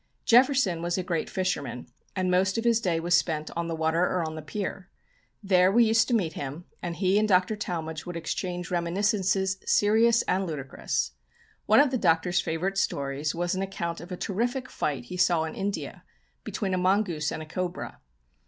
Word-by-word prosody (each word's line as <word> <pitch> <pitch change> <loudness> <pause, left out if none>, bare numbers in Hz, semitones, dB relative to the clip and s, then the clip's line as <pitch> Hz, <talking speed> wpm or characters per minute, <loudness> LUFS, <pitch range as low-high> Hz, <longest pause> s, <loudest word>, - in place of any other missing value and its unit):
Jefferson 245 - +4
was 175 +1 -1
a 185 - -1
great 170 -3 -2
fisherman, 145 -10 -2 0.3
and 185 -1 0
most 190 +3 +2
of 225 - -1
his 235 -1 +3
day 170 -5 0
was 175 +1 +2
spent 155 -2 0
on 170 0 -2
the 165 - -2
water 160 +1 +1
or 180 -1 +1
on 155 - -5
the 155 - -6
pier. 190 +3 -5 0.5
There 185 -1 +4
we 235 +3 +5
used 225 0 +3
to 245 - +2
meet 170 -8 0
him, 145 +5 -6 0.2
and 175 -1 -4
he 190 +2 +2
and 215 - +2
Dr. 185 +2 +3
Talmage 160 -6 -4
would 175 -1 -4
exchange 175 +1 -4
reminiscences, 190 +2 +1
serious 225 +3 +4
and 190 +1 0
ludicrous. 140 -5 -3 0.6
One - - +6
of 285 -2 +5
the 255 - 0
Doctor's 175 0 +2
favourite 185 +5 -1
stories 140 -1 -1
was 175 +1 -1
an 185 - -2
account 180 -3 -4
of 175 +2 -11
a 180 - -4
terrific 245 +7 -2
fight 140 -5 -2
he 180 - -7
saw 175 -3 +3
in 160 - -4
India, 200 +1 -4 0.4
between 195 -3 -3
a 185 - +1
mongoose 180 -5 +1
and 155 - -4
a - - -9
cobra. 180 +3 -5
180 Hz, 190 wpm, -27 LUFS, 165-195 Hz, 0.6 s, One